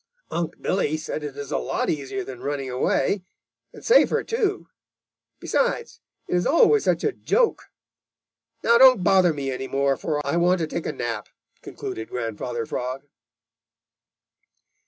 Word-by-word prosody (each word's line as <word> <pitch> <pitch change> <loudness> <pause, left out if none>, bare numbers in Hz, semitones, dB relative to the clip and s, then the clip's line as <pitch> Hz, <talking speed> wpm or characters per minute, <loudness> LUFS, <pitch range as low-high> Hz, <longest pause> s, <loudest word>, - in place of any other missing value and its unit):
Unc' 170 0 -3
Billy 155 -5 0
says 155 0 -5
it 145 -2 -7
is 145 -1 -6
a - - 0
lot - - -2
easier 155 +6 -2
than 130 -7 -9
running 140 -2 -3
away, 135 +8 0 0.5
and - - -13
safer, 480 - +4
too. 435 - -1 0.7
Besides, - - -1 0.3
it - - -4
is 180 0 +2
always 410 +7 +4
such - - +1
a 435 - +2
joke. 480 +4 0 1.0
Now, 235 +1 +5
don't 255 -7 +7
bother 185 -2 +5
me 140 -3 -3
any 130 +1 -4
more, 140 0 +1
for 150 -2 -2
I 140 +4 0
want 180 +1 +3
to 165 - 0
take 160 +1 -4
a - - -1
nap," 115 -3 -4 0.3
concluded 110 - -7
Grandfather 115 0 -4
Frog. 130 +4 -4
155 Hz, 150 wpm, -24 LUFS, 135-190 Hz, 1.0 s, don't